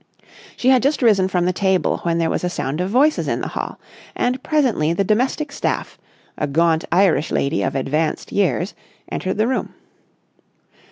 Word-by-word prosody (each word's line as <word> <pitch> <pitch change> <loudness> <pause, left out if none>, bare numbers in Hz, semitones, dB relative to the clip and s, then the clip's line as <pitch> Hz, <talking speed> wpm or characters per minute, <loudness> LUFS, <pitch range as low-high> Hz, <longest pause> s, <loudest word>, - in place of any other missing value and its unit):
She 255 - +2
had 260 -2 +5
just 280 0 +1
risen 200 -5 +4
from 180 -2 0
the 180 - +1
table, 190 -1 +1
when 170 -1 0
there 165 -1 +1
was - - -2
a 180 - 0
sound 150 -1 -3
of 185 - -1
voices 280 +8 +2
in - - -1
the - - -3
hall, - - -5 0.4
and 250 +1 -1
presently 250 - +1
the 195 - +1
domestic 255 +8 0
staff, - - -3 0.4
a 150 - 0
gaunt 160 +2 +2
Irish 175 -3 +3
lady 140 +4 0
of - - -1
advanced 150 +4 -1
years, 195 -1 0 0.4
entered 190 +1 -2
the 215 +2 +2
room. 260 - -2
190 Hz, 175 wpm, -20 LUFS, 165-245 Hz, 0.4 s, had